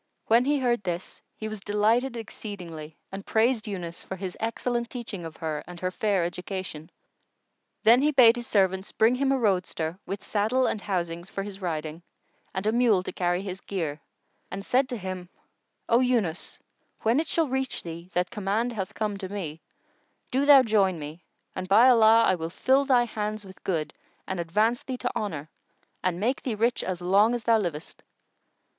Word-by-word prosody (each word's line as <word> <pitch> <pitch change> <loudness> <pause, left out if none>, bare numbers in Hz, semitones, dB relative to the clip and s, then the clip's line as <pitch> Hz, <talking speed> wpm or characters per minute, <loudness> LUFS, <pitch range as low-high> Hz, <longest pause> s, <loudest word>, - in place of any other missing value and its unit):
When 235 +3 +4
he 290 +1 +2
heard 245 -4 +1
this, 180 -2 -5
he 215 - -5
was 215 -1 -5
delighted 220 +5 +1
exceedingly 175 -8 -8
and 195 +1 -6
praised 225 +1 +1
Yunus 175 -4 -5
for 190 - -6
his 185 -1 -5
excellent 235 +1 -2
teaching 225 -8 -6
of 160 - -8
her 155 -2 -3
and 175 -1 -9
her 185 +1 -2
fair 195 -3 +1
education. 180 -3 -5 0.9
Then 235 +3 +7
he 295 - +4
bade 250 -5 +7
his 240 -1 -6
servants 190 -1 +1
bring 225 +2 +3
him 270 +1 +1
a 270 - +3
roadster 180 -6 0
with 195 0 -4
saddle 220 +5 +1
and 215 - -1
housings 170 -2 -3
for 195 - -4
his 200 -1 -8
riding, 160 -2 -3 0.5
and 190 - -4
a 215 - +3
mule 230 -5 +3
to - - -5
carry 175 +1 0
his 190 -1 -6
gear, 160 -6 -3 0.5
and 195 +1 -6
said 260 +2 +2
to 245 - -3
him, 185 -2 -6 0.6
"O 235 - +4
Yunus, 230 -10 0 0.5
when 230 +5 +3
it 320 - -1
shall 325 -1 +1
reach 265 0 -2
thee 170 +1 -8
that 180 0 0
command 215 +2 -1
hath 195 -1 -4
come 210 -2 -2
to 190 -2 -5
me, 165 -6 -5 0.7
do 275 +3 +1
thou 280 -3 +9
join 200 -6 +2
me; 155 +3 -8 0.3
and, 185 0 -4
by 215 +6 +7
Allah, 230 -2 +7
I - - +4
will 165 -2 -3
fill 265 +9 +2
thy 255 -3 +4
hands 215 -2 -4
with 190 -1 -14
good 160 -5 -1 0.3
and 190 -2 -4
advance 215 - +1
thee 260 -1 -5
to 245 - -3
honour 160 -7 -4 0.5
and 180 -1 0
make 245 +7 0
thee 240 -4 -2
rich 235 +3 +1
as 180 -1 -3
long 200 +6 +4
as 240 - -4
thou 225 -1 +4
livest!" 165 -6 -5
205 Hz, 185 wpm, -27 LUFS, 180-235 Hz, 0.9 s, thou